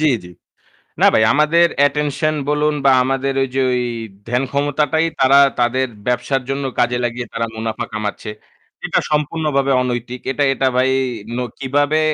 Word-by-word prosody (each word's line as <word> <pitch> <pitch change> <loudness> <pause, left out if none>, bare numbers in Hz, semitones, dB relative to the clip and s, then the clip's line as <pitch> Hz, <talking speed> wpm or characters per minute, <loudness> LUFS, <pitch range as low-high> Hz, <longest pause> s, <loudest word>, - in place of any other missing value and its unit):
জ্বী, 155 -1 +3
জ্বী। 90 - -12 0.7
না - - +7
ভাই 110 - +4
আমাদের 155 +4 +4
অ্যাটেনশন 145 +1 +1
বলুন 150 +1 +1
বা 135 - +6
আমাদের 135 +1 -1
ঐযে 135 0 -2
ঐ - - +1 0.5
ধ্যান 125 +3 0
ক্ষমতাটাই 145 +2 +1
তারা 135 +1 +6 0.2
তাদের 130 +2 +1 0.2
ব্যবসার 125 +2 0
জন্য 135 +1 -2 0.2
কাজে 120 0 +2
লাগিয়ে 120 0 -3
তারা 115 0 -1
মুনাফা 110 0 -3
কামাচ্ছে। 105 0 -4 0.6
এটা - - +1
সম্পূর্ণভাবে 150 -2 0
অনৈতিক। 125 0 -4
এটা, 140 +2 0
এটা 135 0 0
ভাই 130 +1 +3 0.5
ন - - -1 0.2
কিভাবে 145 +3 +1
135 Hz, 150 wpm, -18 LUFS, 125-145 Hz, 0.7 s, না